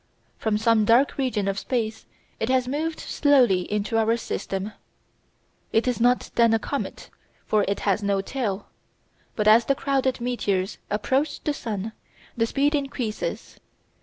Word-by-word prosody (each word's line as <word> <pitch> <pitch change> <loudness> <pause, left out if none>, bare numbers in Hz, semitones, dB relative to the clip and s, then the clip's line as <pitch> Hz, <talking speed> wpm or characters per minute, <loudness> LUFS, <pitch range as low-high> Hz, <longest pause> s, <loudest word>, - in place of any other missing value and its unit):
From 220 -2 +1
some 220 0 +3
dark 235 +6 +4
region 240 -7 0
of 195 0 -1
space 225 -3 -3 0.3
it 225 - -1
has 255 -1 +2
moved 310 +4 -2
slowly 245 -12 +3
into 210 +2 0
our 225 +1 +2
system. 195 -3 -4 1.0
It 225 +3 +2
is 245 -2 0
not 245 +1 +2
then 230 -1 +4
a - - +4
comet, 280 +5 -5 0.3
for 215 -1 +2
it 200 - -1
has 200 0 +1
no 200 -1 +1
tail. 200 -2 -3 0.7
But 210 -1 0
as 225 +2 +7
the 275 - +2
crowded 265 -2 0
meteors 205 -6 -1
approach 265 +8 0
the 300 - 0
sun, 220 -5 -4 0.4
the 230 -1 +1
speed 285 +5 +1
increases. 270 -6 -3
230 Hz, 150 wpm, -25 LUFS, 210-260 Hz, 1.0 s, as